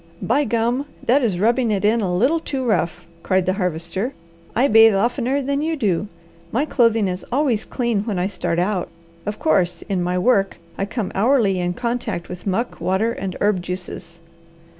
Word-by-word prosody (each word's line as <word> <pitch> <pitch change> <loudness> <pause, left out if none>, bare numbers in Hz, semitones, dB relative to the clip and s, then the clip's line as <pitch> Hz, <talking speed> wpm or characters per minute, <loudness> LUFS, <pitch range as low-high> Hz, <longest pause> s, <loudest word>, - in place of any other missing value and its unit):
"By 280 +6 +1
gum, 235 +4 0 0.2
that 270 +5 +4
is 205 -8 0
rubbing 235 +3 +2
it 205 -1 0
in 225 +2 +3
a 190 -3 -1
little 255 - +2
too 270 -4 -3
rough!" 175 -7 0 0.2
cried 185 -1 +1
the 185 - +1
Harvester. 185 - -2 0.4
"I 260 +4 +4
bathe 225 -2 +7
oftener 250 +6 0
than 280 +2 -1
you 320 +1 0
do. 205 - 0 0.4
My 270 +6 +1
clothing 230 -7 +3
is 180 0 -3
always 255 -5 +1
clean 235 -4 -1
when 210 -5 -2
I 180 - 0
start 185 -3 -2
out. 180 0 0 0.4
Of 210 0 -2
course, 185 - +1
in 190 -3 -2
my 180 +1 0
work 195 0 +2 0.2
I 195 - -2
come 210 -2 -3
hourly 215 -3 +2
in 175 0 -1
contact 235 -7 -3
with 180 +2 -8
muck, 225 +6 -2
water, 195 +5 +1
and 190 -5 -5
herb 205 -3 +2
juices." 175 -1 -6
210 Hz, 180 wpm, -21 LUFS, 185-245 Hz, 0.4 s, bathe